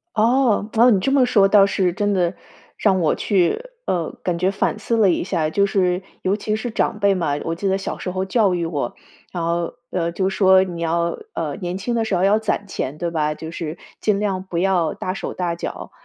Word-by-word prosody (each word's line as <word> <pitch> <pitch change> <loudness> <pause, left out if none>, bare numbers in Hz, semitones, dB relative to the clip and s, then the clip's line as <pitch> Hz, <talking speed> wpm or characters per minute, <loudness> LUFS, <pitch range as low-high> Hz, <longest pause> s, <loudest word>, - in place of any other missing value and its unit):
哦， 225 -1 +3
只 225 - 0
要 250 - +7
你 200 -5 +3
这 270 - 0
么 270 -2 +4
说 200 -5 +4
倒 200 -1 +6
是 190 -3 +1
真 205 +2 0
的 180 -1 +1 0.4
让 190 -3 +2
我 160 - +2
去， 185 - +1 0.3
呃， 170 -3 -1
感 175 -2 -1
觉 185 +2 +2
反 205 +2 -1
思 230 +2 -1
了 205 - +5
一 170 - 0
下， 165 -5 0
就 200 +5 +2
是 185 -2 +1 0.2
尤 195 +2 +1
其 215 0 -2
是 230 +3 -3
长 215 -1 -1
辈 200 -1 +3
嘛， 170 -6 -1
我 165 - -1
记 195 +4 -4
得 190 0 +2
小 195 - -4
时 180 - -4
候 185 +1 -2
教 200 -1 +2
育 170 -1 -1
我， 145 -7 -3 0.4
然 175 -2 -3
后， 170 0 -1 0.2
呃， 170 -2 -1
就 190 +2 0
说 190 -1 +5
你 175 -2 -6
要， 170 +1 0 0.2
呃， - - -3
年 180 +2 -3
轻 235 +5 -2
的 230 -1 +1
时 215 - -1
候 180 - +1
要 205 +2 +4
攒 215 -2 -2
钱， 150 -4 -4
对 170 -1 -2
吧？ 150 -2 0
就 160 +1 -8
是 165 -1 -5 0.2
尽 205 -2 +2
量 195 -3 -1
不 180 -3 -4
要 180 -3 +2
大 185 - -4
手 - - -5
大 175 -2 -2
脚， 170 - -6
190 Hz, 250 characters per minute, -21 LUFS, 170-205 Hz, 0.4 s, 要